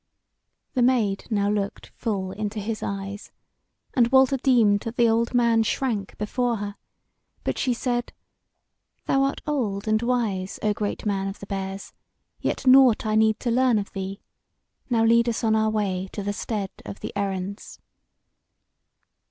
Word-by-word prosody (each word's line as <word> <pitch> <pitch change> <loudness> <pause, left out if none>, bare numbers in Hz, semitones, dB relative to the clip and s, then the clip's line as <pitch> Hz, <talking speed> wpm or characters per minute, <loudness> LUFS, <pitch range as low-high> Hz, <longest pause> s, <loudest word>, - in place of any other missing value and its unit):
The 255 - +1
Maid 235 -6 +2
now 205 -3 +1
looked 205 -1 -2
full 195 -5 -2
into 210 +1 -4
his 215 +1 -4
eyes, 200 +1 -5 0.6
and 240 -4 +4
Walter 265 0 +5
deemed 235 -6 +4
that 230 +3 -6
the 240 -1 +4
old 230 +2 +1
man 235 -2 +4
shrank 220 -3 -1
before 240 +3 0
her; 205 -1 -5 0.7
but - - -2
she 255 - +1
said: 240 0 -2 0.9
"Thou 270 - +2
art 275 0 0
old 220 -9 -2
and 215 0 +2
wise, 225 -6 -1
O 210 -1 +2
great 205 +1 -3
man 195 -2 0
of 195 - -5
the - - -8
Bears, 195 0 -5 0.5
yet - - -2
nought 255 -4 +6
I 215 - 0
need 220 0 +3
to 240 - 0
learn 250 -1 +3
of 200 -1 -3
thee. 195 +1 -6 0.7
Now 230 -2 +3
lead 235 +1 +4
us 230 - -2
on 220 -1 +3
our 220 0 +2
way 195 -3 -1
to 205 - -4
the 205 +1 -2
Stead 205 -2 -3
of 200 - -8
the - - -5
Errands." 195 0 -4
215 Hz, 160 wpm, -25 LUFS, 200-240 Hz, 0.9 s, nought